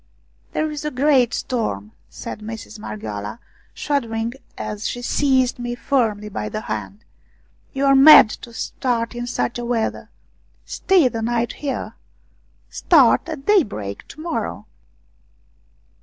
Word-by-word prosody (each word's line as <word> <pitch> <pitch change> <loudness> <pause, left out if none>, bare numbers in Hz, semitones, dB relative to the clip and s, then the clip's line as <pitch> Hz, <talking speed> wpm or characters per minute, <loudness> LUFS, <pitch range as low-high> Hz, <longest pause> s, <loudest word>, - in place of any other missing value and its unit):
" - - -38
There 310 0 -1
is 295 -1 -5
a 300 - -1
great 260 -3 +3
storm," 105 - -3 0.2
said - - -8
Mistress 220 0 -8
Mar 105 - -6
ghioala, 105 +1 -6 0.4
shuddering 230 -5 -2 0.2
as 210 0 -4
she 245 - -5
seized 260 -2 +1
me 240 0 -3
firmly 225 -5 0
by 105 - -4
the 105 - -4
hand. 105 -2 -6 0.3
" - - -38
You 275 +1 +1
are 275 - +5
mad 270 -5 +9
to 235 - -10
start 230 0 -2
in 240 0 -5
such 240 0 -2
weather. 235 -2 -2 0.6
Stay 370 -8 +3
the 230 -2 -3
night 235 +1 -1
here: 280 -2 -4 0.7
start - - +4
at 300 -4 -6
daybreak 200 - 0
to - - -13
morrow." 310 - -4
240 Hz, 140 wpm, -21 LUFS, 210-275 Hz, 0.7 s, mad